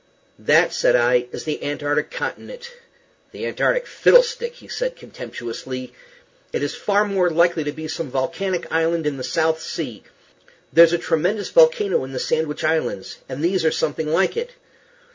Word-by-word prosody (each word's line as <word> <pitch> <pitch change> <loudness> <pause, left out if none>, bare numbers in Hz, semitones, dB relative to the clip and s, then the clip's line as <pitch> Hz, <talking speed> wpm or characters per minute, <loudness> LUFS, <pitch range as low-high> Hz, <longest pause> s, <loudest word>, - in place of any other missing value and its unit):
"That," - - +4
said - - +3
I, 125 0 +3
"is - - -6
the 155 - -4
antarctic 145 0 -1
continent." 485 0 -6 0.6
"The - - -6
antarctic - - 0
fiddlestick," 485 -1 +3 0.2
said - - -2
he, - - -29
contemptuously. 130 - -7 0.6
"It - - -2
is 145 - -2
far 205 0 +1
more 190 -3 +1
likely 170 -1 +2
to 145 - -1
be 155 +1 -7
some 155 -1 -4
volcanic 170 +8 -2
island 165 0 +1
in 145 -2 -1
the 130 - -6
South 160 +2 0
Sea. 125 -13 -5 0.7
There's 170 +1 +7
a - - +3
tremendous 180 +5 -1
volcano 485 - +4
in 135 0 -8
the 130 - -3
Sandwich 155 +1 -1
Islands, 155 -11 -1
and 140 +4 -5
these 180 0 +1
are 160 - +4
something 155 +1 -2
like 185 - +2
it." 485 +1 -4
165 Hz, 160 wpm, -21 LUFS, 145-205 Hz, 0.7 s, There's